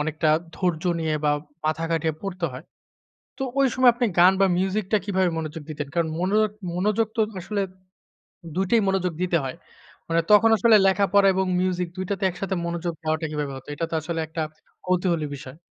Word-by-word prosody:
অনেকটা 155 +1 0 0.3
ধৈর্য 175 -4 -1 0.2
নিয়ে 155 -1 0
বা 150 - +4 0.3
মাথা 155 +1 0
খাটিয়ে 160 -1 0
পড়তে 185 -3 -4
হয়। 125 - -9 0.7
তো 270 - -3 0.2
ওই 270 - +5
সময় 255 -1 +6
আপনি 245 +1 0
গান 180 +2 +7
বা 195 - +6
মিউজিক 195 +2 0
টা - - +6
কিভাবে 190 -3 +1
মনোযোগ 160 0 -5
দিতেন? 150 -2 -4
কারণ 170 -2 +1
মন 185 +2 0 0.5
মনোযোগ 210 +4 +1
তো - - +4 0.2
আসলে 200 +3 -2 0.9
২ 190 +1 +1
টাই 230 -2 +4
মনোযোগ 185 -2 0
দিতে 180 -2 +2
হয়। 130 - -4 0.5
মানে 165 0 +3
তখন 220 +2 +7
আসলে 225 +2 +5
লেখাপড়া 200 +1 +4
এবং 190 0 +1
মিউজিক 180 -1 0
২ 185 - -3
টাতে 200 -1 -2
একসাথে 190 +1 -3
মনোযোগ 170 0 -3
দেওয়াটা 155 0 -1
কিভাবে 150 -2 -3
হত? 130 - -12
এটা 165 - -2
তো - - -5
আসলে 165 +1 -3
একটা 160 +1 -4 0.4
কৌতূহলী 180 -3 +1
বিষয়। 135 +1 -11
180 Hz, 185 wpm, -24 LUFS, 160-195 Hz, 0.9 s, গান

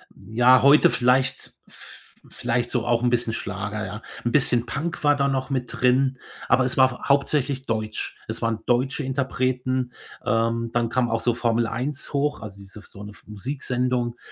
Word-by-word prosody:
Ja, 125 +3 +4
heute 140 +2 +7
vielleicht 130 +1 +1
v - - -15 0.3
vielleicht 120 0 -2
so 120 -3 -1
auch 120 0 +2
'n 125 - +2
bisschen 120 -2 0
Schlager, 105 +1 -4
ja, 105 - -6 0.2
'n 120 - +1
bisschen 120 -4 +2
Punk 155 +7 -4
war 145 0 +5
da 140 -1 +1
noch 135 0 -1
mit 130 -3 -2
drin, 130 +1 +2 0.3
aber 130 - +4
es 125 - -1
war 130 0 +2
hauptsächlich 140 -1 +1
deutsch. 110 -1 -3
Es - - -5
waren 115 -1 0
deutsche 130 +4 +1
Interpreten, 130 -1 -1 0.3
ähm, 115 +1 0
dann 120 -1 0
kam 120 -1 +1
auch 115 0 0
so 120 - +1
Formel 115 -1 +1
Eins 130 +6 -4
hoch, 145 -1 0
also 100 -2 -8
diese 100 +2 -12
f - - -20
so 100 - -12
'ne 105 - -8
f - - -18
Musiksendung 125 +1 -2
125 Hz, 180 wpm, -24 LUFS, 115-130 Hz, 0.3 s, heute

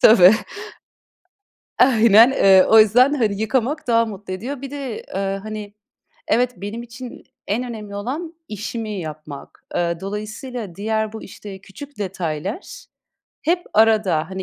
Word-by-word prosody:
Tabii. 195 -2 +8 1.5
Aynen, 230 -1 +6
ııı, 190 -7 +5
o 220 - +8
yüzden, 245 +7 +5
hani, 215 -6 0
yıkamak 260 +6 -1
daha 230 -1 +3
mutlu 200 -3 -7
ediyor. 250 +8 -5
Bir 275 0 -7
de, 275 -6 -5
aaa, 195 +1 -2
hani 210 -1 -7 0.6
Evet, 245 +1 +2
benim 205 +5 -6
için 240 +1 -10 0.2
en 225 +5 0
önemli 215 -4 -7
olan 295 +11 -4
işimi 215 +1 -5
yapmak. 155 -3 -9
Aaa, 170 -1 0
dolayısıyla 210 +1 -6
diğer 220 +2 -2
bu, 220 - -8
işte, 195 -2 -10
küçük 280 +9 -12
detaylar 185 - -5 0.6
hep 350 +3 +1
arada, 210 -7 +3
hani, 190 0 -4
215 Hz, 135 wpm, -21 LUFS, 195-245 Hz, 1.5 s, Tabii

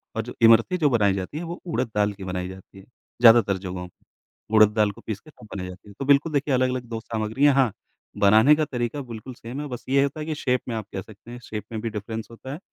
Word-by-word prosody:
और 115 - 0
जो 120 - -8
इमरती 115 +9 +6
जो 155 -4 +3
बनाई 105 -6 +3
जाती 95 +9 -4
है 165 - -4
वो 170 +1 -6
उड़द 130 -8 -1
दाल 105 0 +2
की 100 -1 -10
बनाई 90 -1 -3
जाती 95 +1 -12
है, 95 - -15 0.4
ज़्यादातर 115 -4 +6
जगहों 90 -1 -6
पे, 90 - -27 0.5
उड़द 110 -1 +8
दाल 105 -2 +3
को - - -15
पीस 105 -3 -3
के 155 - -18
वो - - -12
बनाई 90 -2 -4
जाती 90 +2 -11
है। - - -12
तो 135 - -3
बिल्कुल 145 +3 +3
देखिए 145 0 +1
अलग-अलग 130 0 +1
2 115 -1 -3
सामग्रियाँ 115 +6 +1
हाँ, 130 -5 +3 0.5
बनाने 110 +8 +6
का 155 0 0
तरीका 120 +1 -3
बिल्कुल 115 +3 -8
सेम 120 +4 -7
है 150 - -5
बस 125 -3 -7
ये 135 +1 +4
होता 140 +2 -3
है 155 - -4
कि 155 -1 -3
शेप 125 -3 0
में 115 - -2
आप 110 -2 -4
कह 95 - -3
सकते 110 +4 -14
हैं 120 - -8
शेप 105 -2 -6
में 110 -1 -4
भी 115 - -2
डिफरेंस 110 +1 -5
होता 130 +3 -8
है। 150 - -7
115 Hz, 265 wpm, -24 LUFS, 105-135 Hz, 0.5 s, उड़द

